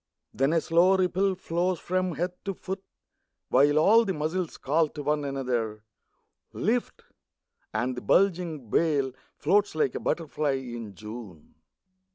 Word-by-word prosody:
Then 135 +3 +2
a 165 - +3
slow 175 +4 +4
ripple 190 +1 +1
flows 175 0 -1
along 185 -1 +1
the 180 +4 -3
body, 190 +1 -3 0.7
While 145 +2 +4
all 220 +9 +6
the 195 -4 -2
muscles 160 +3 -2
call 155 +4 +2
to 145 -1 -7
one 150 +1 0
another: 125 -6 -2 0.3
" - - -49
Lift! 235 +5 -1 0.4
" - - -61 0.3
and 120 +4 -1
the 125 - -5
bulging 170 - +1
bale 145 -5 +2 0.2
Floats 200 +4 +2
like 155 -4 +1
a - - -3
butterfly 155 -3 -1
in 120 -6 -6
June. 105 -6 -10
155 Hz, 145 wpm, -27 LUFS, 130-185 Hz, 0.7 s, all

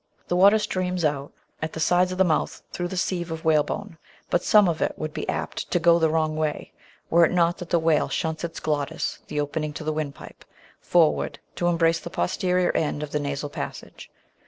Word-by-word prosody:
The 175 - +1
water 200 +4 +6
streams 185 -4 -1
out 145 -1 -1 0.3
at 155 0 -3
the - - -5
sides 180 +3 +3
of 185 - -4
the 190 - +5
mouth 160 -4 0
through 175 - -3
the 185 - -6
sieve 180 -2 -1
of 160 0 -6
whalebone, 160 +1 0 0.3
but 175 - +3
some 210 -2 +6
of 165 -2 -1
it - - 0
would 155 0 -4
be - - -4
apt - - -3
to 175 - +1
"go 170 0 +5
the 160 -1 +3
wrong 155 -1 0
way" 155 -1 -2 0.4
were 170 +1 +6
it - - -1
not 175 -1 +2
that 175 - -7
the 175 - +3
whale 160 -2 +2
shunts 160 -1 -2
its 170 -1 -4
glottis 145 -2 -2
(the 150 - -3
opening 150 +1 -2
to 155 - -6
the 155 0 -1
windpipe) 150 -2 -6 0.4
forward 165 -3 +2 0.2
to 175 - -1
embrace 165 -1 +2
the - - -8
posterior 180 +1 0
end 150 -1 -1
of 150 - -6
the 150 - 0
nasal 145 0 -3
passage. - - -7
165 Hz, 210 wpm, -25 LUFS, 155-175 Hz, 0.4 s, water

